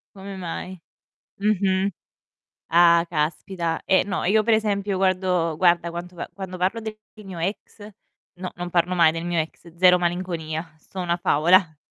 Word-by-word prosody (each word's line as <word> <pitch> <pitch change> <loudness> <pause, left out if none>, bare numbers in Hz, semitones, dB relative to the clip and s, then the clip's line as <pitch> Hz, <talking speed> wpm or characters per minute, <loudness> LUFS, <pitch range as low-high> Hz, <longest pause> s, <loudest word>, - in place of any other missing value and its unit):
Come 195 +1 -8
mai? 185 +1 -6 0.6
Mh-mh. 195 -1 +1 0.8
Ah, 170 0 +6
caspita. 165 +2 -2
Eh, 190 - +4
no, 195 -1 -3
io 215 +4 +3
per 225 +1 +3
esempio 205 -2 0
guardo 185 -3 +1
guarda 170 0 +3
quanto 175 +1 -8
a - - -5
quando 190 -2 -6
parlo 190 +5 0
del 220 -1 -7 0.3
mio 185 -3 -8
ex 195 +5 -4 0.6
no, 185 0 -5
non 175 0 -5
parlo 175 +1 +1
mai 170 -3 +5
del 165 +1 -5
mio 175 -1 -1
ex, 165 +1 -7
0 180 0 +6
malinconia, 170 -2 -3
sto 185 +4 -9
una 175 -1 0
favola. 170 0 +3
180 Hz, 155 wpm, -23 LUFS, 170-190 Hz, 0.8 s, Ah